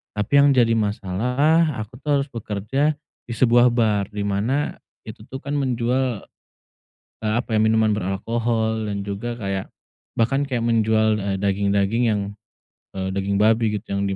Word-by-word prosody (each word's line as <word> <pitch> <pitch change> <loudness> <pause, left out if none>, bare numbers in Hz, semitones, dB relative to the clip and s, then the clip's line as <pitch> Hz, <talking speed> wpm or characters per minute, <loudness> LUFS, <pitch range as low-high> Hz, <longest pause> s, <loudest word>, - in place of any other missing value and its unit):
Tapi 105 +3 -3
yang 140 -1 +5
jadi 115 -2 +4
masalah, 125 - +1
aku 110 +3 -7
tuh 145 -2 +1
harus - - -12
bekerja 115 +7 -1 0.3
di 115 - -4
sebuah 120 +1 +5
bar, 110 -5 +1
di 105 - -2
mana 110 +9 -1 0.2
itu 110 +1 -11
tuh 135 +1 -8
kan 140 - -5
menjual, 125 -2 -1 1.0
eee 110 -1 0
apa 120 -2 -3
ya? 110 - +3
Minuman 110 0 +3
beralkohol 110 +2 -1
dan 100 -1 -4
juga 115 +4 -4
kayak 95 -3 -4 0.5
bahkan 135 +5 +2
kayak 120 -3 -1
menjual, 110 -2 +2
eee, 95 -1 -2
daging-daging 100 +3 +1
yang, 105 -1 0 0.7
eee, 95 0 -3
daging 100 +1 -1
babi 110 +1 +3
gitu. 105 0 -7
Yang 100 0 -1
110 Hz, 155 wpm, -22 LUFS, 100-120 Hz, 1.0 s, yang